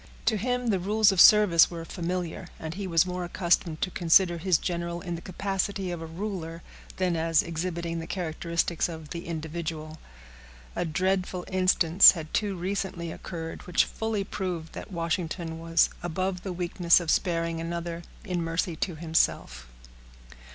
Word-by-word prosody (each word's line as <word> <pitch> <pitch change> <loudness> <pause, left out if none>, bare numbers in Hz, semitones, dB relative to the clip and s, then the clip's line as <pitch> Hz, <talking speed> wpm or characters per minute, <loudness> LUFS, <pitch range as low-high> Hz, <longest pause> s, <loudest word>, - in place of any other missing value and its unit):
To 220 - +3
him 250 +4 -1
the 195 -3 +2
rules 210 +3 +3
of 190 - +4
service 205 -6 +7
were 165 -1 -7
familiar, 175 0 -4
and 160 0 -5
he 195 +1 -5
was 165 0 +3
more 180 0 -4
accustomed 175 -2 0
to 185 - -1
consider 175 0 +4
his 180 -1 +3
general 170 0 -3
in 175 -1 -5
the 170 - -5
capacity 195 +1 -2
of 175 -2 -5
a 165 - -6
ruler, 170 -2 -5 0.3
than 185 -2 +1
as 165 -1 +2
exhibiting 170 0 -3
the 165 - -6
characteristics 170 -1 -1
of 160 -2 -8
the 170 -1 -6
individual. 160 -1 -5 0.8
A - - -1
dreadful 185 +2 -1
instance 185 -1 +6
had 160 -3 -8
too 205 -2 0
recently 180 -2 -3
occurred, 165 -1 -7
which 180 - +3
fully 220 -2 -2
proved 180 -5 -4
that - - -8
Washington 165 -1 -3
was 165 0 +2
above 180 +2 -2
the 190 - -5
weakness 175 -1 +3
of 170 -3 -1
sparing 165 -2 0
another 170 0 -4 0.2
in 180 -4 -2
mercy 165 +1 -1
to 175 0 -2
himself. 155 - 0
170 Hz, 160 wpm, -27 LUFS, 165-185 Hz, 0.8 s, service